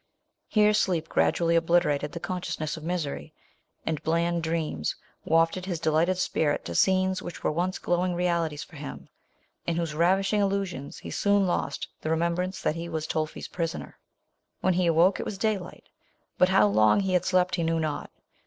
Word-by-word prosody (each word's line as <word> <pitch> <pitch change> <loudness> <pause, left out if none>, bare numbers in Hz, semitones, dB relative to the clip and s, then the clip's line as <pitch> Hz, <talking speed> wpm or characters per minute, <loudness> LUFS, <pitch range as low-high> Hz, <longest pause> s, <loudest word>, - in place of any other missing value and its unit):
Here 210 -1 +4
sleep 180 -6 +1
gradually 170 -1 +2
obliterated 165 -4 +2
the 170 - -6
consciousness 175 -4 -3
of 160 - -9
misery, 155 - -3 0.5
and 155 -2 -2
bland 170 +2 +1
dreams 160 - -2 0.3
wafted 165 +3 +2
his 175 -4 -2
delighted 165 +3 +2
spirit 155 -5 0
to 85 - -4
scenes 185 - +2
which 175 - -8
were - - +2
once 180 +4 -1
glowing 175 0 0
realities 170 -4 0
for - - -14
him, 70 +1 -8 0.6
in 170 - +1
whose 165 -2 -2
ravishing 195 +6 +2
illusions 195 -8 -2
he - - -8
soon 200 -1 +2
lost 175 - -2
the 155 - -3
remem 170 +1 +1
brance 185 +2 -3
that - - +2
he 170 +1 -5
was 160 -2 -3
Tolfi's 155 -1 -3
prisoner. 165 -1 -4 0.6
When 185 - +3
he 180 0 +1
awoke, 170 +4 +4
it - - -2
was 200 - -5
daylight; 200 -4 -2 0.6
but 180 - +5
how 185 - +5
long 110 - +4
he 190 -1 -1
had 180 - +3
slept 185 -1 +2
he 170 - 0
knew 165 0 +1
not. 155 -2 -3
170 Hz, 175 wpm, -27 LUFS, 160-185 Hz, 0.6 s, but